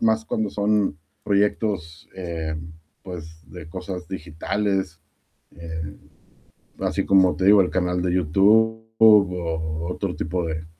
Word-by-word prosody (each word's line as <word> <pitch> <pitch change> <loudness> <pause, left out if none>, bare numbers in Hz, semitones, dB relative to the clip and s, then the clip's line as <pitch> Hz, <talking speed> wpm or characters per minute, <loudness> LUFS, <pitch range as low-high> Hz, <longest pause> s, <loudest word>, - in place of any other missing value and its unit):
más 110 0 +2
cuando 110 -1 -1
son 105 -6 +1 0.3
proyectos, 100 -5 -1
eh, 85 -4 -4 0.5
pues, 80 -3 -9
de 80 -1 -10
cosas 90 +1 -7
digitales, 95 +1 -2 0.6
eh, 80 -2 -6 0.9
así - - -1
como 95 -2 +4
te 95 - -1
digo, 100 0 +7
el 90 - +2
canal 90 -1 0
de 90 -1 0
YouTube, 100 +6 +4 0.2
o 85 -6 +3
otro - - -3
tipo 85 +2 -2
de 80 0 -4
90 Hz, 120 wpm, -23 LUFS, 80-100 Hz, 0.9 s, digo